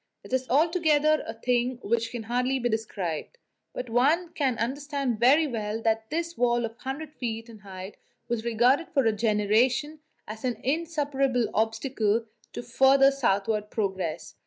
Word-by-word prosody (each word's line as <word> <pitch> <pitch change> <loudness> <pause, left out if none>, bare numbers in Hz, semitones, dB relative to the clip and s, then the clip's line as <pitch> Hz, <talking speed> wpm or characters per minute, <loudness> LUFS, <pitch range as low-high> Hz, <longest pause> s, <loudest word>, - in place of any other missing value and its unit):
It - - -10
is 260 0 0
altogether 310 0 +3
a 225 - -5
thing 245 +2 0
which 230 +1 0
can 235 -1 -6
hardly 250 +3 0
be 240 -2 -1
described; 215 - -3 0.3
but 250 - -6
one 290 +9 +2
can 265 -5 0
understand 275 -1 -2
very 275 +7 +5
well 220 -5 -3
that 220 0 0
this 335 +2 -3
wall 240 -1 +1
of 225 - -5
100 280 +4 -6
feet 225 -2 -4
in 225 -2 -13
height 190 0 -9 0.3
was 235 -2 -2
regarded 240 +7 +2
for 275 -5 +1
a 225 - +4
generation 225 +7 +1 0.3
as 215 +1 -8
an 250 -2 0
insuperable 280 -4 0
obstacle 225 0 0 0.3
to - - -5
further 270 +2 +5
southward 210 -4 0
progress. 190 -7 -3
245 Hz, 155 wpm, -27 LUFS, 220-275 Hz, 0.3 s, very